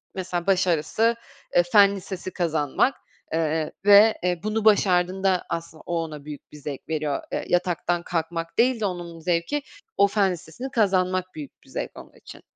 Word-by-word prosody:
mesela 180 -2 -3
başarısı, 185 +4 +2 0.4
eee, 175 - +6
fen 200 -1 +6
lisesi 185 -1 -6
kazanmak, 160 - +1 0.4
eee, 160 -1 0
ve, 205 +2 +7
eee, 180 -1 0
bunu 215 0 -1
başardığında 190 -2 +3
aslında 165 -1 -5
o 170 -1 -1
ona 150 -3 -8
büyük 150 -1 -10
bir 150 - -11
zevk 145 0 -7
veriyor. 150 -3 -2
Eee, - - -3
yataktan 175 -1 0
kalkmak 165 -1 -3
değil 245 0 +3
de 215 - -1
onun 175 -3 -5
zevki 170 - -1 0.4
o 200 - +6
fen 200 -2 +2
listesini 180 +10 -7
kazanmak 185 -4 +1
büyük 150 -3 -10
bir - - -21
zevk - - -4
onun - - -14
için. - - -14
180 Hz, 160 wpm, -24 LUFS, 165-200 Hz, 0.4 s, ve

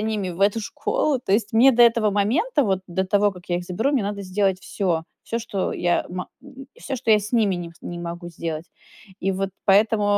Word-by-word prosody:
ними 215 -4 -2
в 175 - -9
эту 205 +3 +3
школу. 285 +4 -1
То 195 - -2
есть 210 0 +1
мне 240 +4 +7
до 240 0 +5
этого 230 -2 +4
момента, 270 - +1
вот 190 -2 0
до 190 +2 -1
того, 205 +1 +3
как 180 -1 -15
я 175 - +2
их 175 - -4
заберу, 225 +11 -1
мне 265 -6 +2
надо 200 0 -3
сделать 190 0 0
всё. 180 -5 -1 0.2
Всё, 230 - -3
что 205 -4 -3
я 175 0 0
ма 180 +1 -5
м, 270 -1 -12
всё, 265 - -4
что 235 -2 -1
я 215 - +8
с 210 +2 -7
ними 215 -5 +3
не 175 -1 -5
с - - -26
не 175 - -6
могу 175 0 -6
сделать. 165 -1 -5 0.5
И 195 +1 0
вот 195 +1 -2
поэтому, 210 +2 +4
200 Hz, 230 wpm, -23 LUFS, 180-225 Hz, 0.5 s, я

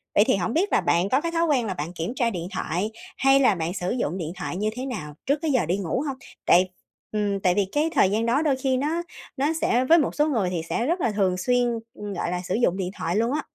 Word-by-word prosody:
vậy 205 - +7
thì - - +4
hổng 195 +4 -1
biết 375 +8 +1
là - - +4
bạn 175 +3 +2
có 265 +5 +2
cái 335 +1 -2
thói 335 0 +1
quen 275 -7 +2
là 195 - -2
bạn 165 +2 -5
kiểm 175 +6 -4
tra 240 -3 +1
điện 175 -5 -4
thoại, 185 +4 -2 0.3
hay 270 0 +5
là 250 -7 +4
bạn 165 +1 -2
sử 180 -2 -2
dụng 190 - -1
điện 165 -2 -4
thoại 180 -1 -4
như 210 +2 0
thế 255 +1 -4
nào 180 - -5
trước 280 - +3
cái 320 -2 0
giờ 255 - +2
đi 175 +4 0
ngủ 200 - -2
hông? 270 -2 -3 0.3
Tại 185 +2 +5 0.4
ừm, 205 -2 0
tại 185 -2 +2
vì 205 - +2
cái 300 +2 +1
thời 195 - +5
gian 220 +2 +1
đó 240 +5 +2
đôi 295 -4 +2
khi 260 0 0
nó 305 +6 0 0.4
nó 290 +4 +1
sẽ 245 +2 +2
với 330 +5 +6
một 310 - +1
số 300 +1 +2
người 220 -11 +1
thì 175 -3 -2
sẽ 235 - 0
rất 340 +5 0
là 230 - +1
thường 190 -3 +1
xuyên, 245 +5 +2 0.3
ừm, 205 -1 -6
gọi 175 -1 -2
là, 180 - -2
sử 180 - -2
dụng 190 -6 +2
điện 185 -2 -2
thoại 170 +2 -2
luôn 230 +4 +1
á. 305 - 0
220 Hz, 285 wpm, -25 LUFS, 180-270 Hz, 0.4 s, vậy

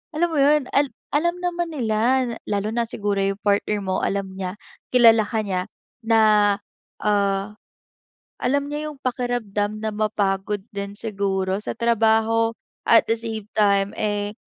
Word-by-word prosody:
alam 345 +2 +2
mo - - 0
yun, 290 -1 +4
al 280 0 +3 0.2
alam 345 +4 +1
naman 350 -1 -2
nila, 250 -1 +1 0.2
lalo 205 0 -1
na 235 - +1
siguro 205 -2 -2
yung 195 0 -1
partner 205 +1 +1
mo, 190 -1 -1
alam 195 -1 -1
niya, 185 0 -4 0.4
kilala 230 -3 +6
ka 220 - -1
niya, 185 -2 -1 0.4
na 225 0 +3 0.8
ah, 200 0 +1 0.9
alam 280 +3 +1
niya 300 +1 -3
yung 295 - -12
pakiramdam 225 -5 -2
na 220 - -1
mapagod 205 -1 -1
din 200 0 -5
siguro 195 -3 -1
sa - - -4
trabaho. 225 0 +2 0.3
At 230 - +6
the - - +5
same 220 -2 -5
time 200 -2 +2
eh, 205 -1 -1
215 Hz, 145 wpm, -23 LUFS, 200-245 Hz, 0.9 s, kilala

